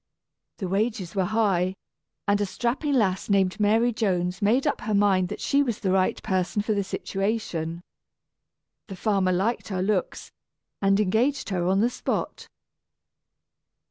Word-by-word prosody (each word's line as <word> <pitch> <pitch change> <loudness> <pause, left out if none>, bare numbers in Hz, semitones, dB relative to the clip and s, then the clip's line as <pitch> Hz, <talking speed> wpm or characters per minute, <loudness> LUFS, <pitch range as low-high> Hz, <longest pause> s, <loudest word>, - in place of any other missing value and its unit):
The 190 - -4
wages 200 -1 -1
were 190 -2 +1
high, 195 -4 +1 0.5
and 205 0 +2
a - - +2
strapping 250 +8 -1
lass 190 -6 +1
named 195 -1 +2
Mary 225 +3 +3
Jones 180 -4 -1
made 230 +6 +2
up - - 0
her 215 -1 -1
mind 195 -3 +3
that - - -5
she 280 - +2
was 240 -6 -1
the 190 - 0
right 185 0 +2
person 190 +2 0
for 215 - 0
the 200 -1 0
situation. 190 -5 -3 1.0
The 195 - -7
farmer 195 -1 +1
liked 195 +7 0
her 185 -3 -2
looks, 195 -2 -2 0.5
and 195 0 +3
engaged 225 +8 +1
her 175 -2 0
on 190 +2 +3
the 235 - +3
spot. - - -3
200 Hz, 150 wpm, -25 LUFS, 185-220 Hz, 1.0 s, Mary